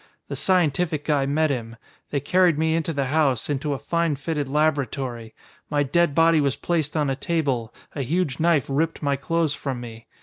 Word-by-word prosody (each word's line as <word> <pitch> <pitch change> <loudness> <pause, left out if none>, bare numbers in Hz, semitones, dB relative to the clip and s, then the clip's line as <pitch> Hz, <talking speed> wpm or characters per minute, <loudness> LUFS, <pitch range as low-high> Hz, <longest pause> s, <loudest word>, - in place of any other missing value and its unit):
The - - -3
scientific 165 -4 +1
guy 145 -3 +1
met 155 +2 +2
him. 115 -3 -4 0.3
They 140 - 0
carried 175 +3 +3
me 160 +1 +1
into 165 0 0
the 140 -3 -1
house, 140 -2 +1
into 145 +1 -1
a - - -2
fine 170 +5 0
fitted 145 0 -3
laboratory. 135 -6 -1 0.3
My 145 -1 +1
dead 150 +2 +1
body 165 -1 +5
was 140 -2 +1
placed 160 -3 -1
on 145 -3 +1
a - - -1
table, 135 -7 -1 0.2
a 145 - -3
huge 145 0 -1
knife 160 -4 +3
ripped 155 +4 -1
my 140 -1 +2
clothes 160 +2 0
from 135 -4 -4
me. 115 -1 -10
145 Hz, 190 wpm, -24 LUFS, 135-165 Hz, 0.3 s, body